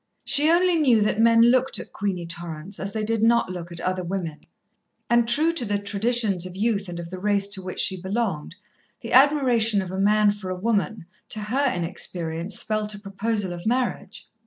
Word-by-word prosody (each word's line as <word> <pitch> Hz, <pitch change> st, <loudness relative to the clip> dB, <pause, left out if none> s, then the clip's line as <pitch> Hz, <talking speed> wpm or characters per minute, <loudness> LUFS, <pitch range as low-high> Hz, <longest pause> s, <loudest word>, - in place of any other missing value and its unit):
She 295 Hz, +2 st, +2 dB
only 350 Hz, +1 st, +3 dB
knew 260 Hz, -8 st, +4 dB
that 210 Hz, +1 st, 0 dB
men 230 Hz, 0 st, +5 dB
looked 255 Hz, +2 st, +3 dB
at -, -, -8 dB
Queenie 190 Hz, -4 st, -3 dB
Torrance 170 Hz, +2 st, -6 dB
as 195 Hz, +1 st, -1 dB
they 215 Hz, +1 st, -3 dB
did 225 Hz, 0 st, -1 dB
not 230 Hz, -4 st, +3 dB
look 175 Hz, -1 st, -7 dB
at 170 Hz, -, -8 dB
other 185 Hz, +1 st, -2 dB
women, 175 Hz, -4 st, -5 dB, 0.6 s
and, 235 Hz, -1 st, +3 dB
true 305 Hz, +7 st, +3 dB
to 335 Hz, -6 st, -3 dB
the 205 Hz, -2 st, -1 dB
traditions 205 Hz, -1 st, 0 dB
of 180 Hz, -, -11 dB
youth 205 Hz, -2 st, -1 dB
and 170 Hz, -1 st, -6 dB
of 170 Hz, 0 st, -8 dB
the 185 Hz, -, -6 dB
race 200 Hz, 0 st, +1 dB
to 200 Hz, -2 st, -5 dB
which 185 Hz, 0 st, -6 dB
she 185 Hz, -2 st, +1 dB
belonged, 190 Hz, -5 st, -3 dB, 0.5 s
the 230 Hz, -, -6 dB
admiration 250 Hz, -6 st, +4 dB
of 185 Hz, -2 st, -4 dB
a 190 Hz, -, -4 dB
man 210 Hz, +1 st, +4 dB
for 205 Hz, -2 st, -7 dB
a 185 Hz, -, -3 dB
woman, 215 Hz, -1 st, -1 dB, 0.2 s
to 215 Hz, -, -3 dB
her 255 Hz, +6 st, 0 dB
inexperience 170 Hz, 0 st, -3 dB
spelt 215 Hz, -1 st, -2 dB
a -, -, -10 dB
proposal 200 Hz, -1 st, -2 dB
of 175 Hz, +3 st, -7 dB
marriage. 250 Hz, +2 st, -2 dB
205 Hz, 200 wpm, -24 LUFS, 185-230 Hz, 0.6 s, men